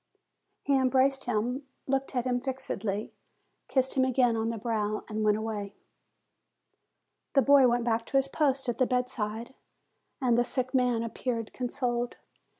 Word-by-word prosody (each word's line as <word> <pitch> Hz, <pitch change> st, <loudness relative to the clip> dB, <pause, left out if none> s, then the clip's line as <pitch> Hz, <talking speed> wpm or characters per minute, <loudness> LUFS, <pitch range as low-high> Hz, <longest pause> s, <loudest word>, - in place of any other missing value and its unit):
He 280 Hz, -, +2 dB
embraced 265 Hz, +1 st, +3 dB
him, 245 Hz, +4 st, -1 dB, 0.2 s
looked 270 Hz, 0 st, -1 dB
at 245 Hz, -1 st, 0 dB
him 245 Hz, -1 st, 0 dB
fixedly, 225 Hz, -6 st, -3 dB, 0.5 s
kissed 260 Hz, -1 st, +1 dB
him 260 Hz, -, +3 dB
again 250 Hz, -2 st, +3 dB
on 225 Hz, 0 st, 0 dB
the 230 Hz, -, -3 dB
brow, 215 Hz, -1 st, -1 dB
and 215 Hz, 0 st, -2 dB
went 210 Hz, 0 st, +3 dB
away. 210 Hz, -2 st, -4 dB, 1.6 s
The 275 Hz, -, +5 dB
boy 280 Hz, 0 st, +7 dB
went 240 Hz, 0 st, +1 dB
back 230 Hz, -1 st, 0 dB
to 270 Hz, -, +1 dB
his 270 Hz, 0 st, +2 dB
post 275 Hz, -2 st, 0 dB
at 240 Hz, -2 st, -2 dB
the 255 Hz, -, +4 dB
bedside, 245 Hz, -2 st, -2 dB, 0.7 s
and 245 Hz, -3 st, +3 dB
the -, -, +4 dB
sick 255 Hz, +1 st, -3 dB
man 250 Hz, -3 st, +2 dB
appeared 230 Hz, -1 st, -3 dB
consoled. 245 Hz, -1 st, -2 dB
245 Hz, 150 wpm, -29 LUFS, 225-265 Hz, 1.6 s, boy